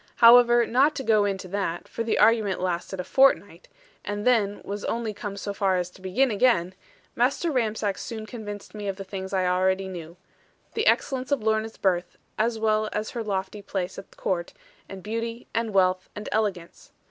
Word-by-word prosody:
However, 240 0 +7
not 275 +7 +3
to 270 - -4
go 215 -3 +3
into 195 -2 -3
that 195 -3 -3
(for 230 - -4
the 230 - 0
argument 215 -3 +3
lasted 180 +1 -3
a - - -1
fortnight; 275 - +2 0.4
and 205 0 -4
then 215 -5 +2
was 205 +1 -5
only 230 -2 -2
come 205 -1 -6
so 200 0 -4
far 195 -2 +1
as 180 0 -2
to 185 - -17
begin 230 +8 +1
again), 200 -5 +2 0.4
Master 275 +7 +1
Ramsack 220 -6 -1
soon 220 -2 -6
convinced 205 -2 -8
me 210 -1 -6
of 195 - -2
the 195 - -7
things 190 0 -6
I 190 -1 +1
knew 180 - +2
already; 185 -2 -1 0.6
the 440 - 0
excellence 260 0 +1
of 280 -6 +1
Lorna's 220 0 0
birth, 180 -2 0 0.2
as 225 +1 +1
well 215 -1 +1
as 215 +1 -3
her 235 -2 -4
lofty 195 0 -3
place 190 -2 -4
at 195 - -14
Court, 175 -2 -2 0.4
and 190 -2 -9
beauty, 230 +2 -4
and 230 -1 -1
wealth, 185 -1 +2
and 210 - -6
elegance. 200 -6 -2
205 Hz, 185 wpm, -25 LUFS, 190-230 Hz, 0.6 s, However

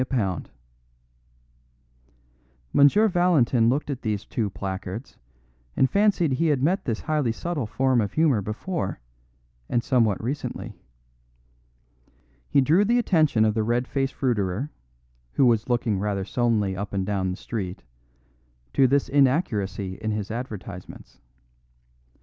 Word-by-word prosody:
a - - +3
lb." 105 - -2 2.3
M. 200 +11 +5
Valentin 145 -10 +3
looked 145 +3 0
at 130 - -5
these 105 -2 -2
two 110 -3 -2
placards 95 +5 -6 0.6
and 130 - +3
fancied 200 -6 +3
he 145 +6 +1
had 140 -4 +1
met 185 +6 +1
this 115 -4 -2
highly 150 -6 0
subtle 150 -1 -3
form 130 +1 +2
of 105 - -3
humour 150 -9 +3
before, 115 - -4 0.7
and 120 - +1
that - - -18
somewhat 115 -7 +2
recently. 135 +6 -4 1.8
He 140 - +4
drew 160 +9 +4
the 235 +4 +2
attention 155 - +3
of 110 - +2
the 110 - 0
red 120 +3 0
faced 135 -1 -2
fruiterer, 115 +1 -1 0.6
who 135 - +3
was 115 -1 +2
looking 120 -5 +1
rather 100 -1 -2
sullenly 110 -4 0
up 100 +2 -5
and 95 -1 -1
down 95 -2 -1
the 90 - -4
street, 95 -6 -5 0.9
to 135 - +5
this 140 +2 +2
inaccuracy 120 - +1
in 110 - -2
his 105 -1 -3
advertisements. 105 -6 -8
120 Hz, 135 wpm, -25 LUFS, 105-145 Hz, 2.3 s, M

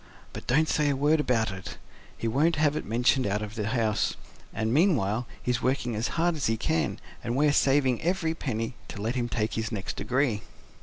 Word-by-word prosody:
But - - -8
don't 155 +6 +3
say 150 -2 +2
a 140 - +1
word 150 +3 +3
about 115 -7 +1
it; 95 -1 -7 0.4
he 115 - -2
won't 150 +9 +2
have 150 -1 +2
it - - -4
mentioned 120 +2 +2
out 105 +2 -1
of 105 0 -6
the 105 -3 -3
house. 110 -2 +1 0.4
And 110 +1 -1
meanwhile 125 - +2 0.2
he's 125 0 0
working 125 -3 0
as 110 +3 0
hard 170 +1 +2
as 150 - -1
he 115 0 +1
can, 80 -6 0 0.2
and 120 0 -2
we're 145 +1 +3
saving 135 -4 +3
every 170 -2 0
penny, 115 -7 -3
to - - -8
let 110 +4 -1
him 120 -2 -1
take 110 -1 -1
his 110 0 -2
next 100 -4 -4
degree." 120 +1 0
120 Hz, 205 wpm, -27 LUFS, 110-145 Hz, 0.4 s, don't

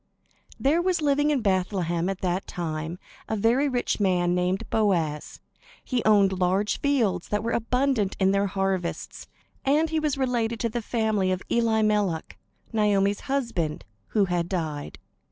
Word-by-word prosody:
There 300 +6 +3
was 365 -1 +1
living 290 0 +2
in 285 -4 +1
Bethlehem 185 -3 0
at 195 -1 -4
that 185 +1 -1
time 160 0 -4 0.3
a 220 - 0
very 235 +7 +2
rich 245 -3 -1
man 180 -3 +2
named 180 +1 0
Boaz. 170 -9 0 0.4
He 250 -3 -1
owned 195 -3 +4
large 190 +3 +1
fields 225 -11 +1
that 210 0 -1
were 230 - -1
abundant 245 -3 0
in 190 0 +3
their 200 0 +2
harvests; 195 -2 -3 0.4
and 305 +4 +2
he 320 - +1
was 300 -3 -1
related 235 -4 0
to 230 - 0
the 240 +2 -3
family 220 -4 0
of 185 0 -2
Elimelech, 215 -7 +1 0.3
Naomi's 205 -2 +2
husband, 230 - -1 0.2
who 210 -3 +2
had 175 -2 -1
died. 155 -6 -3
205 Hz, 150 wpm, -26 LUFS, 180-240 Hz, 0.4 s, owned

